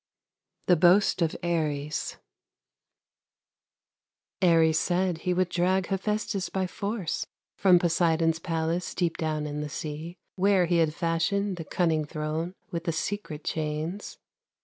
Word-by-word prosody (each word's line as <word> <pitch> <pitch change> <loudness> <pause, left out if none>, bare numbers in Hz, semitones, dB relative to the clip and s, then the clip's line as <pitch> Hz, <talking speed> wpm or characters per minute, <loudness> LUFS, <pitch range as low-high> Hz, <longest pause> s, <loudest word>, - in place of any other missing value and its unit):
THE 180 - +5
BOAST 180 +3 +4
OF 165 -2 +1
ARES 150 -3 -1 2.2
Ares 165 -3 +4
said 180 -1 0
he 180 +2 0
would 185 0 +1
drag 185 +2 +1
Hephestus 200 -1 -1
by 190 -1 -1
force 200 -1 -3 0.3
From 185 -2 +5
Poseidon's 165 -2 +2
palace 165 +1 -2
Deep 175 -3 0
down 155 -2 -1
in 150 0 -4
the 150 - -4
sea; 155 +4 -6 0.2
Where 190 -1 +4
he 175 0 +2
had 160 -2 +2
fashioned 175 +4 0
The 165 - -6
cunning 160 -3 +1
throne 155 +3 -3 0.2
With 170 -1 -4
the 170 - +1
secret 160 -2 -4
chains. 155 +5 -3
170 Hz, 125 wpm, -27 LUFS, 160-185 Hz, 2.2 s, THE